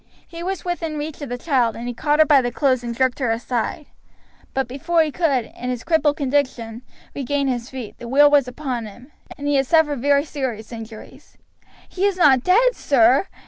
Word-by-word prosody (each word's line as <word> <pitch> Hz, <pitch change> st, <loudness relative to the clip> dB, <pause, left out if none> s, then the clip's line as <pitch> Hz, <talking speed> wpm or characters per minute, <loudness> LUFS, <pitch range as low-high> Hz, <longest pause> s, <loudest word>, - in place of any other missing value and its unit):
He 335 Hz, -1 st, -9 dB
was 380 Hz, +2 st, -4 dB
within 330 Hz, -3 st, -3 dB
reach 300 Hz, +1 st, -6 dB
of 285 Hz, -, -6 dB
the 245 Hz, -, -3 dB
child, 245 Hz, -5 st, +1 dB
and 235 Hz, +1 st, -6 dB
he 245 Hz, -, -3 dB
caught 295 Hz, +5 st, 0 dB
her 310 Hz, -, +6 dB
by 285 Hz, -2 st, +5 dB
the 245 Hz, -1 st, -2 dB
clothes 260 Hz, -1 st, +1 dB
and 235 Hz, -1 st, -5 dB
jerked 260 Hz, 0 st, +1 dB
her 255 Hz, -4 st, 0 dB
aside; 240 Hz, +6 st, -2 dB, 0.7 s
but 270 Hz, -1 st, -1 dB
before 325 Hz, +6 st, +1 dB
he 310 Hz, -, -3 dB
could, 275 Hz, -8 st, 0 dB
in 250 Hz, -, -5 dB
his 245 Hz, -2 st, -4 dB
crippled 315 Hz, -3 st, +1 dB
condition, 255 Hz, -5 st, -1 dB, 0.3 s
regain 280 Hz, +1 st, -1 dB
his 245 Hz, -2 st, -3 dB
feet, 255 Hz, -5 st, -8 dB
the 240 Hz, -, -8 dB
wheel 290 Hz, +4 st, +5 dB
was 285 Hz, -3 st, +4 dB
upon 250 Hz, -4 st, -4 dB
him, 245 Hz, +7 st, -14 dB, 0.3 s
and 290 Hz, -1 st, -5 dB
he 290 Hz, -1 st, +2 dB
has 270 Hz, -1 st, +1 dB
suffered 300 Hz, -4 st, +3 dB
very 285 Hz, +1 st, +3 dB
serious 255 Hz, -8 st, -5 dB
injuries." 225 Hz, -1 st, -11 dB, 0.5 s
"He 380 Hz, +1 st, -2 dB
is 395 Hz, -2 st, -2 dB
not 280 Hz, -7 st, +5 dB
dead, 475 Hz, +7 st, +4 dB
sir?" 265 Hz, +4 st, +3 dB
275 Hz, 205 wpm, -21 LUFS, 245-305 Hz, 0.7 s, her